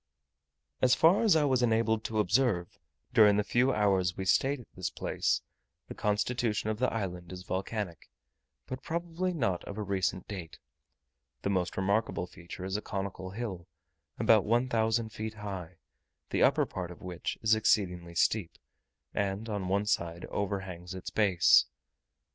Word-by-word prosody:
As 130 Hz, 0 st, +5 dB
far 170 Hz, +5 st, +5 dB
as 220 Hz, -6 st, +5 dB
I 155 Hz, -, +4 dB
was 130 Hz, -3 st, +2 dB
enabled 110 Hz, -2 st, +2 dB
to 110 Hz, -, -2 dB
observe, 105 Hz, -5 st, +1 dB, 0.3 s
during 105 Hz, -4 st, +6 dB
the 105 Hz, -, +2 dB
few 125 Hz, +5 st, +2 dB
hours 95 Hz, -5 st, +2 dB
we 95 Hz, -, -3 dB
stayed 135 Hz, +9 st, +2 dB
at 120 Hz, -, -13 dB
this 90 Hz, -, -2 dB
place, -, -, -1 dB, 0.5 s
the -, -, -5 dB
constitution 105 Hz, +1 st, 0 dB
of 110 Hz, -, -4 dB
the 125 Hz, -, +2 dB
island 90 Hz, -5 st, -4 dB
is 90 Hz, 0 st, -7 dB
volcanic, 95 Hz, -1 st, -4 dB, 0.6 s
but 130 Hz, 0 st, -6 dB
probably 170 Hz, +2 st, -2 dB
not 115 Hz, -, -1 dB
of 100 Hz, -, -7 dB
a 105 Hz, -, -2 dB
recent 95 Hz, -2 st, -1 dB
date. 85 Hz, -5 st, -7 dB, 0.9 s
The 100 Hz, -, 0 dB
most 90 Hz, -2 st, -1 dB
remarkable 100 Hz, 0 st, 0 dB
feature 90 Hz, +1 st, -9 dB
is 95 Hz, +1 st, -3 dB
a 105 Hz, -, -1 dB
conical 95 Hz, -2 st, -4 dB
hill, 95 Hz, -4 st, -5 dB, 0.5 s
about -, -, +5 dB
one 120 Hz, +4 st, +1 dB
thousand 115 Hz, -1 st, +1 dB
feet 110 Hz, 0 st, -5 dB
high, 95 Hz, -4 st, -6 dB, 0.6 s
the -, -, +1 dB
upper -, -, +4 dB
part 90 Hz, -2 st, -5 dB
of 90 Hz, -, -11 dB
which 90 Hz, -2 st, -4 dB
is 110 Hz, 0 st, +5 dB
exceedingly 90 Hz, -6 st, +1 dB
steep, 95 Hz, 0 st, +1 dB, 0.6 s
and 100 Hz, +2 st, -1 dB
on 100 Hz, -3 st, -2 dB
one 100 Hz, +2 st, +1 dB
side 85 Hz, -4 st, -1 dB
overhangs 95 Hz, -3 st, -4 dB
its 95 Hz, -, -6 dB
base. 95 Hz, -5 st, +5 dB
100 Hz, 160 wpm, -30 LUFS, 95-115 Hz, 0.9 s, during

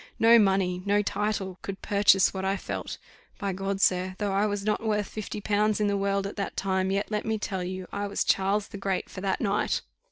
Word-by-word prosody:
No 230 Hz, +1 st, +7 dB
money, 190 Hz, -3 st, +2 dB
no 205 Hz, +1 st, +2 dB
title, 205 Hz, -2 st, -2 dB
could 195 Hz, -1 st, -7 dB
purchase 200 Hz, -2 st, +4 dB
what 190 Hz, -1 st, -4 dB
I 195 Hz, +1 st, 0 dB
felt. -, -, -5 dB, 0.4 s
By 200 Hz, -1 st, -2 dB
G, 195 Hz, +1 st, -2 dB
sir, 185 Hz, -1 st, +2 dB
though 205 Hz, -1 st, -1 dB
I 200 Hz, +2 st, +2 dB
was 205 Hz, -1 st, -3 dB
not 215 Hz, +1 st, 0 dB
worth 210 Hz, -2 st, 0 dB
fifty 210 Hz, -1 st, -6 dB
pounds 210 Hz, +1 st, +1 dB
in 210 Hz, -, +2 dB
the 200 Hz, 0 st, +1 dB
world 200 Hz, 0 st, 0 dB
at 200 Hz, -, -6 dB
that 200 Hz, -, -3 dB
time, 190 Hz, -1 st, 0 dB
yet 200 Hz, +3 st, -1 dB
let 210 Hz, 0 st, -1 dB
me 220 Hz, 0 st, -1 dB
tell 190 Hz, -3 st, -3 dB
you, 185 Hz, +1 st, -5 dB
I 205 Hz, 0 st, -2 dB
was 200 Hz, -, -1 dB
Charles 195 Hz, +2 st, +1 dB
the 200 Hz, -, -8 dB
Great 195 Hz, -1 st, -2 dB
for 185 Hz, -, -7 dB
that 190 Hz, -1 st, 0 dB
night." 205 Hz, -1 st, 0 dB
200 Hz, 225 wpm, -27 LUFS, 190-210 Hz, 0.4 s, No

